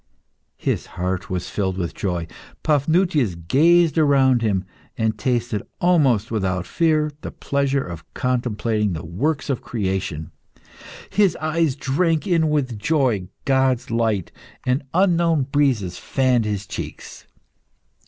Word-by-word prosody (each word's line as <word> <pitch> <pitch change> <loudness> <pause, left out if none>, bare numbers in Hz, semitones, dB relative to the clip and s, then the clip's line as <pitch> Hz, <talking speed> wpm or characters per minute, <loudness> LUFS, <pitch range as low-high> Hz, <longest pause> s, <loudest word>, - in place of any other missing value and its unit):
His - - -2
heart 90 +1 -2
filled 95 +1 -2
with 85 -3 -3
joy, 90 -4 -2 0.4
Paphnutius 150 - +2
gazed 160 - +3
around 135 -5 +4
him, 100 -4 +1 0.3
and 110 -1 +1
tasted, 120 -2 -1 0.2
almost 135 - +3
without 95 -5 -1
fear, 155 - +1
the - - -5
pleasure 140 -1 0
of 85 -3 -9
contemplating 110 -5 0
the 80 0 -5
works 135 - -1
of 135 -4 -1
creation; 95 -8 -3 0.8
his 200 -4 +3
eyes 155 -2 0
drank 155 +4 0
in 165 -5 +2
with 130 -7 -1
joy 125 - +1 0.2
God's 130 -3 +1
light, 110 -6 0 0.3
and 125 +2 +1
unknown 170 -5 +3
breezes 130 -10 0
fanned 130 -4 +1
his 100 -2 -2
cheeks. - - -8
125 Hz, 120 wpm, -22 LUFS, 100-150 Hz, 0.8 s, around